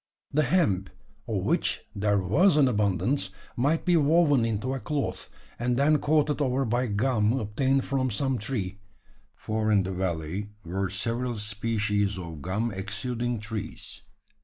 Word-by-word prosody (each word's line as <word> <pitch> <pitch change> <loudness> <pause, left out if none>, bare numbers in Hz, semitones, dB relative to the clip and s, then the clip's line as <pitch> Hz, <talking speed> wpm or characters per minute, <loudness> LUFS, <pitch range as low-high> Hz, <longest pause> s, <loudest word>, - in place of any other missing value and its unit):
The 150 - +4
hemp, 125 - +2 0.4
of 105 -5 -1
which - - 0
there 105 0 +1
was 145 - +4
an 140 -3 +6
abundance, 105 0 +1 0.3
might 145 +7 +1
be 180 -2 +4
woven 145 -4 +4
into 115 +3 -1
a 135 - -2
cloth, 140 +5 -3 0.3
and 120 0 0
then 150 +2 +4
coated 150 0 +2
over 135 0 +1
by 120 +2 0
gum 110 0 +2
obtained 130 +5 +1
from 130 -2 0
some 130 +3 -1
tree; 100 -4 -3 0.6
for 110 0 -1
in 100 -2 +4
the 95 +1 -3
valley 90 +2 -2 0.2
were 95 +3 -2
several 115 +5 -2
species 105 -1 -1
of 85 -4 -7
gum 105 +8 -1
exuding 115 +5 -3
trees. 110 0 -6
110 Hz, 145 wpm, -27 LUFS, 100-135 Hz, 0.6 s, an